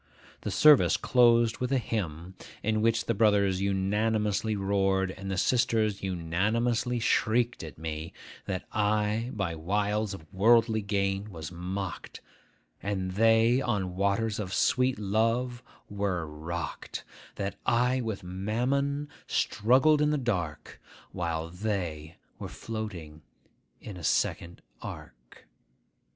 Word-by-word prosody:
The - - -3
service 150 -2 +6
closed 120 -2 +4
with 125 +1 -2
a 135 - +3
hymn, 95 -7 -3 0.3
in 110 0 +1
which 115 +1 +2
the 115 - +1
brothers 100 -3 +3
unanimously 105 +2 0
roared, 95 -1 +1
and 95 +1 -7
the 95 - -2
sisters 110 -2 +1
unanimously 110 +8 0
shrieked 120 +1 +1
at 75 -4 -9
me, 80 +1 -5 0.3
That 95 -1 -3
I 105 +2 0
by 95 -6 -2
wiles 105 +5 -1
of 80 - -12
worldly 110 +2 +4
gain 100 0 -1
was 80 -4 -7
mocked, 90 +2 -5 0.6
and 95 -2 -2
they 115 +5 +4
on 100 -8 -1
waters 100 +3 0
of 95 -2 -3
sweet 125 -1 +2
love 115 +4 0 0.3
were 100 -4 -2
rocked; 80 +3 -6 0.3
that 100 0 -4
I 125 +1 +2
with 110 -4 -4
mammon 125 +10 -1 0.2
struggled 135 +7 +3
in 150 - +3
the 150 - +1
dark, 90 - -3 0.3
while 85 -2 -3
they 90 -6 -4 0.2
were - - -6
floating 90 -9 -6 0.6
in 100 -4 -9
a 85 - -9
second 85 +3 -1 0.2
ark. - - -10
105 Hz, 120 wpm, -28 LUFS, 95-115 Hz, 0.6 s, service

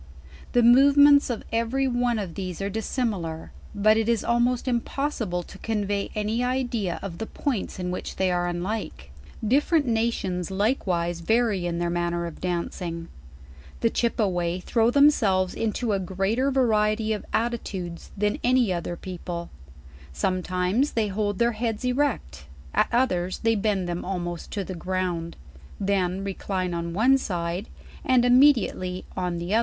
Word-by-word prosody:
The 245 - +4
movements 285 +4 +7
of 235 -3 -3
every 235 +4 +1
one 245 -1 +1
r>f 190 -6 -4
thes 185 -2 -5
e 195 - -2
are 200 - -2
dissimilar; 200 -7 -3 0.2
but 215 +2 +4
it 225 0 +1
is 230 -2 +1
almoct 240 +2 +1
impossible 235 -6 -1
to - - -13
convey 205 -2 -1
any 215 +3 0
idea 245 -7 -1
of 180 -4 -6
the 225 - -4
points 255 -9 -3
in 180 -1 -3
which 180 - -5
they 190 -1 +1
are 175 0 0
unlike. 175 - -4 0.4
Different 290 +5 +3
nations 225 -6 -1
likewise 190 -5 0
vary 210 -1 +1
in 170 -1 -2
their 170 0 -1
manner 175 0 -1
of 170 - -8
dancing. 170 -1 -3 0.7
The 230 - +2
Chipeway 185 -7 0
throw 230 -1 +2
themselves 220 -10 +4
into 225 0 -1
a 195 - +1
greater 195 +8 0
variety 220 -4 +2
of 210 - -4
attitudes 200 -7 -3
than 205 +1 0
any 245 -5 +3
other 175 0 -3
people; 175 -1 -6 0.6
some 185 - -1
times 185 +10 0
they 220 -2 +1
hold 205 0 -1
their 235 0 +3
heads 225 +1 -3
erect, 250 - -1 0.3
at - - +3
others 185 -8 +1
they 225 0 +4
bend 200 -3 0
them 175 0 -3
almost 175 -2 -4
to 200 - -2
the 185 - -6
ground; 180 -1 -3 0.4
then 195 -1 0
recline 190 -2 -3
on 170 0 -3
one 260 +6 +4
side, 175 -2 -3 0.3
and 255 -2 +3
immediately 245 -8 +3
on 180 -2 -2
the 175 +4 -3
other. 225 - +5
205 Hz, 155 wpm, -25 LUFS, 180-235 Hz, 0.7 s, movements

